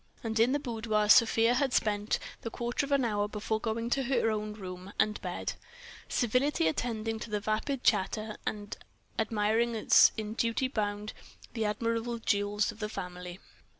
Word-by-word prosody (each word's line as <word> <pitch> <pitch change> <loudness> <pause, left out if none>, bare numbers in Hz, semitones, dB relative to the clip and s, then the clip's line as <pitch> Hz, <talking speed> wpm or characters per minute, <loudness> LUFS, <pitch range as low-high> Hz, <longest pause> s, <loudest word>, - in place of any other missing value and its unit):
And 220 -1 -1
in 235 +3 +5
the 285 - +2
boudoir 225 -5 -1
Sofia 230 +1 +6
had 265 +1 +1
spent 210 -1 +1 0.2
the 230 - -4
quarter 240 +4 -2
of - - -9
an 275 -3 +3
hour 205 -2 0
before 215 +1 -2
going 225 0 -2
on - - -2
to 270 - +2
her 240 -3 +2
own 215 0 -3
room 185 -2 -8
and 210 0 +1
bed, 180 -2 -3 0.6
civilly 250 +3 +2 0.2
attending 225 +5 -2
to 210 -2 -3
vapid 220 +6 -2
chatter 215 +3 +1
and 205 -1 -4 0.4
admiring 225 +2 +1
as 220 - +6
in 215 -1 -3
duty 230 +3 0
bound 210 -3 -3 0.4
the 225 -2 -1
admirable 230 +2 -1
jewels 205 -1 0
of - - -15
the 210 -1 -3
family. 180 -2 -6
220 Hz, 165 wpm, -30 LUFS, 210-235 Hz, 0.6 s, Sofia